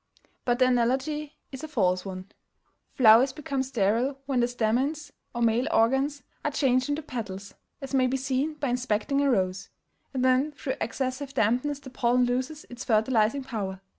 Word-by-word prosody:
But 245 -1 +2
the 255 - +4
analogy 265 +5 0 0.2
is 265 +1 -8
a - - -4
false 185 -10 +1
one. 190 0 -8 0.6
Flowers 245 +2 +6
become 275 -3 -3
sterile 250 +1 0
when 270 -2 0
the 240 - +3
stamens 260 +6 -1 0.2
or 240 - 0
male 230 +2 +2
organs 265 +4 +2 0.2
are - - +1
changed 260 -2 +1
into 295 +2 -1
petals, 200 -7 -6 0.3
as 275 0 -7
may 260 -1 +3
be 265 +1 0
seen 270 +3 -1
by 285 -3 -2
inspecting 250 +3 0
a 285 - +2
rose; 190 -4 0 0.4
and 260 -2 -2
when 260 +4 +3
through 270 -2 -4
excessive 260 +3 -3
dampness 250 +7 +1
the 275 -2 -12
pollen 250 0 +2
loses 255 +5 -2
its 245 0 -8
fertilizing 225 +2 +2
power. 200 -7 -4
255 Hz, 165 wpm, -27 LUFS, 230-275 Hz, 0.6 s, Flowers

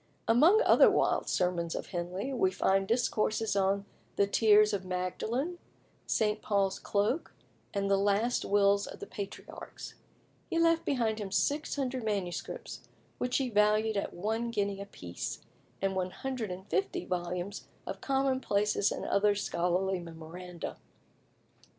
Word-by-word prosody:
Among 325 - +6
other - - +7
wild - - +1
sermons 175 -2 0
of - - -4
Henley, 185 +8 -3
we 190 -7 +3
find 195 +1 +1
discourses 220 -2 +1
on 195 0 +1 0.3
"The 200 - +4
Tears 210 +1 +5
of 195 -2 -1
Magdalen," 220 - -2 0.5
"St. 210 -1 +1
Paul's 195 -2 +1
Cloak," 210 +10 -1 0.4
and 200 -1 -1
"The 195 0 +3
Last 205 +4 +2
Wills 200 0 +3
of - - -9
the - - -6
Patriarchs." 200 -1 -8 0.6
He - - -1
left 330 0 +3
behind 230 -5 0
him 205 -2 -4
600 270 0 0
MSS., 200 -5 -3 0.4
which 250 0 +1
he 260 -3 -1
valued 215 +1 +3
at 200 - -1
one 220 +6 -1
guinea 200 -3 -1
a 200 - -7
piece, 90 - -6 0.4
and 195 -1 +1
150 220 - -2
volumes 180 +2 -3 0.2
of - - -6
commonplaces 260 -7 +1
and - - -4
other 205 +1 +3
scholarly 185 -1 0
memoranda. 170 +1 -8
205 Hz, 130 wpm, -31 LUFS, 190-230 Hz, 0.6 s, other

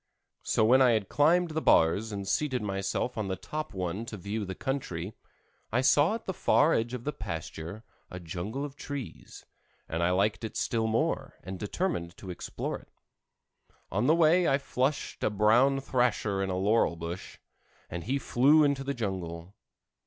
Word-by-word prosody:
So 110 - +2
when 130 +4 +6
I 125 -2 +6
had 105 -3 -1
climbed 165 +3 +3
the 160 +1 -1
bars 100 - +3
and 100 -1 -5
seated 130 -1 0
myself 100 +4 -2
on 105 - -2
the 95 - -1
top 155 +9 -5
one 95 +2 -3
to 105 - -6
view 100 +3 -3
the 95 0 -5
country, 110 -9 -3 0.6
I 120 +3 +2
saw 145 +8 +4
at 230 - -8
the 190 - -2
far 160 -2 +3
edge 120 +2 0
of 120 - -7
the 150 - -2
pasture, 85 +5 -6 0.3
a 90 - -7
jungle 95 - -4
of 140 -1 -8
trees, 145 -4 -8 0.4
and 80 +1 -2
I 85 - +3
liked 100 +5 +1
it 110 0 -5
still 115 -1 0
more, 110 +1 -1
and 95 +1 -6
determined 105 - -2
to 95 - -7
explore 90 - -4
it. - - -21 1.0
On 105 +7 +1
the 155 - +5
way 170 +2 +4
I 135 - +4
flushed 140 +1 -2
a - - +3
brown 115 +7 +4
thrasher 120 -7 0
in 95 - -1
a 90 - -1
laurel 100 -1 +2
bush, 85 +2 -7 0.5
and 85 0 -6
he 130 +5 0
flew 140 +4 +4
into 140 -2 +1
the 140 0 -3
jungle. 90 -5 -4
110 Hz, 180 wpm, -29 LUFS, 95-135 Hz, 1.0 s, when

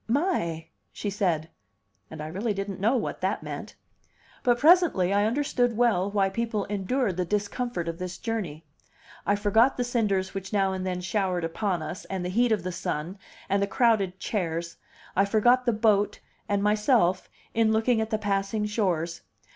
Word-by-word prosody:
"My!" 220 - 0 0.2
she 205 - -4
said. 170 -5 -1 0.6
And 160 -1 -8
I - - -4
really 200 +6 -2
don't 195 -1 -4
know 220 +7 +2
what - - -3
that - - -1
meant. - - -7 0.7
But 240 -1 +3
presently 295 - +4
I 205 +1 +3
understood 245 -1 +1
well 220 -6 +2
why 200 -1 +2
people 215 +1 -2
endured 205 +1 -1
the 180 - +1
discomfort 205 0 -2
of 165 0 -4
this 180 0 -5
journey. 185 -10 -4 0.6
I 205 - +4
forgot 220 +5 +3
the 250 - +1
cinders 210 -6 0
which 195 -1 -6
now 195 -2 +2
and 185 0 -3
then 180 -1 -2
showered 185 -2 -1
upon 170 +1 -1
us, 155 +4 -6
and 190 -2 -4
the - - -2
heat 235 +5 +2
of 210 -5 +1
the 185 - -3
sun, 170 +2 -4 0.3
and 200 +1 +1
the 200 - +1
crowded 200 -4 +2
chairs; 170 -4 -3 0.4
I 195 - +4
forgot 240 +5 +3
the - - +5
boat 210 -2 +2 0.3
and 200 -1 +1
myself, 210 -3 +2 0.2
in 225 -1 +3
looking 220 +1 +2
at 220 - -2
the 220 - 0
passing 205 0 -1
shores. 175 -6 -1
200 Hz, 175 wpm, -27 LUFS, 185-225 Hz, 0.7 s, the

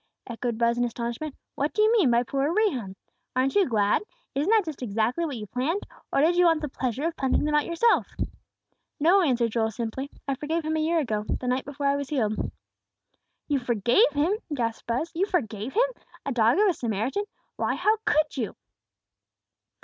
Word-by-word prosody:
echoed 235 -1 -3
Buz, 235 +1 +2
in - - +3
astonishment. 240 +5 -3 0.2
"What 290 +2 -1
do 425 - +3
you 435 - +5
mean 405 - +4
by 235 0 +3
poor 275 +4 0
Rehum? 275 - 0 0.4
Aren't 260 +1 +2
you 395 -6 +3
glad? 210 -3 +2 0.3
Isn't 290 +7 0
that 435 -3 +4
just 310 -4 -6
exactly 230 +8 0
what 285 -6 -4
you 215 - -6
planned; 265 - -1 0.3
or - - +3
did 335 +4 +4
you 360 - +5
want 325 -2 +4
the 300 - -2
pleasure 260 +1 -3
of 330 0 -1
punching 265 -1 +1
them 300 0 0
out 300 0 +2
yourself?" 400 +8 +3 0.9
"No," 350 +6 +5
answered 245 -8 +2
Joel, 225 -1 +1
simply; 235 +5 -4 0.2
"I 275 - +1
forgave 310 +4 -2
him 315 0 0
a - - +1
year 325 +2 +1
ago, 220 -9 0 0.2
the 250 - -5
night 255 +1 0
before 285 0 -5
I 280 0 +3
was 280 -1 -4
healed." 220 -7 0 1.0
"You 285 -2 +1
forgave 240 - +3
him!" 300 +6 +2 0.2
gasped 230 -5 -2
Buz, 255 +9 -1
"you 375 +4 0
forgave 230 - -2
him! - - +3 0.4
A 280 - -1
dog 235 +2 +3
of 420 +1 +5
a 375 - +3
Samaritan! 240 - -2 0.3
Why, - - 0
how 430 +1 +2
could 305 -4 +2
you?" 230 -5 -2
275 Hz, 195 wpm, -26 LUFS, 235-330 Hz, 1.0 s, you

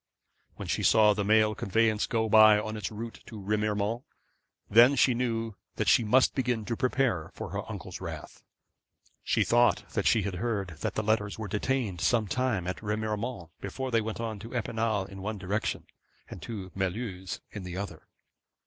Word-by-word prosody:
When - - -7
she - - -1
saw 105 -1 +5
the 105 0 -1
mail 110 +1 +4
conveyance 110 +1 +1
go 115 -3 0
by 110 -1 +7
on 110 +1 -4
its 105 -4 -3
route 115 +2 -7
to 110 - -8
Remiremont, 105 +2 -1 0.7
then 120 +6 +7
she 130 - +4
knew 115 -2 -1 0.2
that - - -1
she - - +5
must 125 +5 +4
begin 125 -4 -1
to 115 - -2
prepare 125 - 0
for - - -6
her - - -4
uncle's - - -7
wrath. - - -7 0.8
She - - +2
thought 120 +1 +3
that - - 0
she 110 - +4
had 95 -2 -3
heard 105 -6 -1
that - - -3
the 110 - 0
letters 105 -1 0
were 110 -1 -5
detained 105 -2 -1
some 115 -3 +2
time 120 -5 0
at 90 0 -4
Remiremont 105 -3 -3
before 130 -1 -4
they 115 -1 +3
went 110 +1 -4
on 110 -3 -4
to 115 +5 -9
Epinal 110 -3 -1
in 95 0 -10
one 105 +2 -3
direction, 100 +3 -2 0.4
and - - -9
to 100 -6 -6
Mulhouse 95 -1 -3
in 105 - -6
the 90 -1 -6
other. 95 -5 -6
110 Hz, 180 wpm, -29 LUFS, 100-115 Hz, 0.8 s, by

